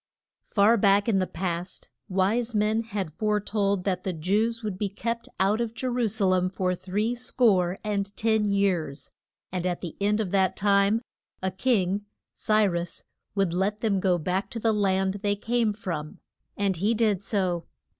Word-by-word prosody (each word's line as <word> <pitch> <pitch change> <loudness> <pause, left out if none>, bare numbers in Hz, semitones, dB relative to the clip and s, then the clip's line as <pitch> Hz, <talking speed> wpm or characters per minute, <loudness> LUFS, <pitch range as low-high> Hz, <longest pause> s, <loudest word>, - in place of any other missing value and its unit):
FAR 215 +3 +3
back 200 0 +4
in 205 -4 +3
the 185 - 0
past, 175 0 -4 0.2
wise 215 +5 +1
men 215 +2 +2
had 200 -8 -4
fore 210 +4 +1
told 200 -2 0
that 185 -2 -1
the 190 - -2
Jews 215 +8 0
would 200 -3 -4
be 205 - 0
kept 230 +4 -4
out 200 +4 +2
of 230 -1 -3
Je 260 - -4
ru 245 -2 +1
sa 215 -1 0
lem 185 -1 +2
for 185 -1 -1
three 205 +6 -1
score 205 -7 +2
and 200 -2 -1
ten 220 -1 +2
years, 180 -9 0 0.4
and 180 -1 -2
at 175 -1 -2
the 170 -4 -6
end 210 +2 +2
of 200 -5 -2
that 190 -1 +2
time 200 +2 +3 0.4
a 190 - 0
king, 200 -2 0 0.3
Cy 215 -1 +2
rus, 175 -2 -3 0.3
would 195 -4 +1
let 195 +4 0
them 205 -4 +1
go 185 -2 +2
back 180 +4 -2
to 230 - -5
the 225 0 +2
land 195 -1 +1
they 205 -1 +1
came 230 +1 0
from. 175 -7 -5 0.4
And 195 -3 0
he 210 +7 +1
did 215 -4 +2
so. 185 -4 -1
200 Hz, 180 wpm, -26 LUFS, 185-215 Hz, 0.4 s, back